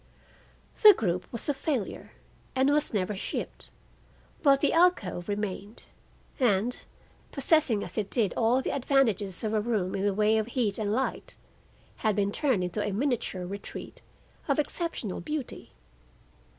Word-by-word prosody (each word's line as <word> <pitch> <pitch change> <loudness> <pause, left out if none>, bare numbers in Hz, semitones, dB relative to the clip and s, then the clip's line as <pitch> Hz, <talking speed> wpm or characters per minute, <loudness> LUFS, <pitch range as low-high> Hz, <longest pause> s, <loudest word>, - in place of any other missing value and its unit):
The 425 -3 +10
group 180 - -2
was 235 - -5
a 290 - +2
failure 275 - -3 0.4
and 265 +2 +3
was 300 0 +3
never 205 -1 -1
shipped; 190 - -5 0.7
but 275 -3 +5
the 290 - +2
alcove 325 - +2
remained, 205 +1 -4 0.6
and, 235 -1 +1 0.5
possessing 275 -6 +2
as 180 +4 -3
it 200 -2 -3
did 220 -6 +1
all 245 +3 +2
the - - -1
advantages 235 -9 +1
of 215 0 -1
a 215 - +2
room 210 -5 -1
in 195 - -2
the 200 -1 +1
way 215 +1 +3
of 215 - -2
heat 230 -5 -1
and 205 -1 -1
light, 260 +5 -2 0.6
had 215 -2 +1
been 200 -1 +1
turned 255 -7 +1
into 180 +4 -2
a 205 - -2
miniature 220 -5 -1
retreat 200 +2 -8 0.5
of 280 - +2
exceptional 300 - -2
beauty. 300 -4 -5
220 Hz, 150 wpm, -28 LUFS, 200-270 Hz, 0.7 s, The